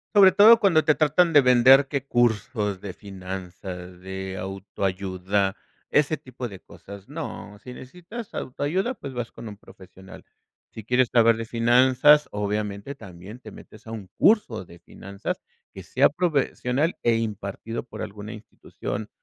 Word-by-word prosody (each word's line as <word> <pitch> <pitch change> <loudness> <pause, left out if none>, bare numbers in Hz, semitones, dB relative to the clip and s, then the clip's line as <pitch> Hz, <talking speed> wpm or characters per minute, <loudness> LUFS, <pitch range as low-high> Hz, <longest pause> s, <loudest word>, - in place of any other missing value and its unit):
Sobre 195 -2 +8
todo 215 +4 +7
cuando 170 -6 +3
te 155 - +5
tratan 160 +3 +2
de 145 - +8
vender, 130 +2 +6
qué 140 -1 -3
cursos 110 -4 0
de 100 -3 -7
finanzas, 95 -2 -8
de 95 0 -6
autoayuda, 95 0 -2 0.3
ese 150 +1 +2
tipo 130 -2 -7
de 95 -4 -11
cosas, 100 +3 -13
no, 145 -9 -7
sí 125 +4 -11
necesitas 180 - -10
autoayuda 170 - -2
pues 140 - -9
vas 120 -1 -4
con 115 -1 -10
un 105 - -9
profesional. 95 -1 -15 0.5
Si 110 - -10
quieres 125 +2 +2
saber 115 -1 +5
de 115 - -4
finanzas, 125 +6 +4
obviamente 105 +3 -3
también 95 -2 -12
te 110 - -11
metes 110 +2 -15
a - - -7
un 110 -4 -7
curso 125 - +3
de 85 - -15
finanzas 100 +3 -7 0.3
que - - -9
sea - - +3
profesional 150 -2 0
e 120 -1 +2
impartido 110 0 -4
por 125 - -8
alguna 105 +1 -8
institución 105 -1 -7
115 Hz, 150 wpm, -24 LUFS, 100-140 Hz, 0.5 s, Sobre